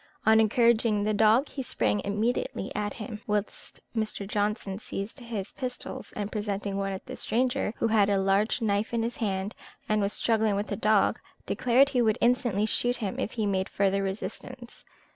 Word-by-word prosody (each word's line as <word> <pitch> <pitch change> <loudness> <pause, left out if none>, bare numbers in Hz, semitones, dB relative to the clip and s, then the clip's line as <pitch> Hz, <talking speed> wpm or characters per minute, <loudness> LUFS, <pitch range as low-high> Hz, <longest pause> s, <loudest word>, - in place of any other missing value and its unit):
On 220 0 +6
encouraging 225 -1 +3
the 215 +1 +1
dog, 220 +6 +4
he 275 - -5
sprang 105 - 0
immediately 210 0 -1
at 205 -1 -2
him, 215 -1 -7
whilst 210 -1 -3 0.2
Mr. 215 -2 -2
Johnson 205 -1 -1
seized 210 +3 -6
his 225 -5 -5
pistols, 255 0 -5
and 205 0 -4
presenting 205 -1 -2
one 195 0 -1
at 190 - -6
the - - -7
stranger, 245 -2 0
who - - +1
had 210 -2 +4
a 200 - +3
large 195 +4 +2
knife 210 +2 0
in 230 - +1
his 235 +1 -3
hand, 195 -1 -2 0.3
and 215 0 +2
was 200 0 0
struggling 220 -2 +2
with 205 +1 -1
the 205 - -1
dog, 210 +1 +3 0.3
declared 255 +3 +3
he 255 -3 +1
would 220 -2 +2
instantly 240 -4 +2
shoot 245 +3 +1
him 205 -5 -3
if - - -2
he 220 -3 -1
made 190 -2 0
further 195 0 +1
resistance. 235 +5 -6
215 Hz, 180 wpm, -28 LUFS, 200-235 Hz, 0.3 s, On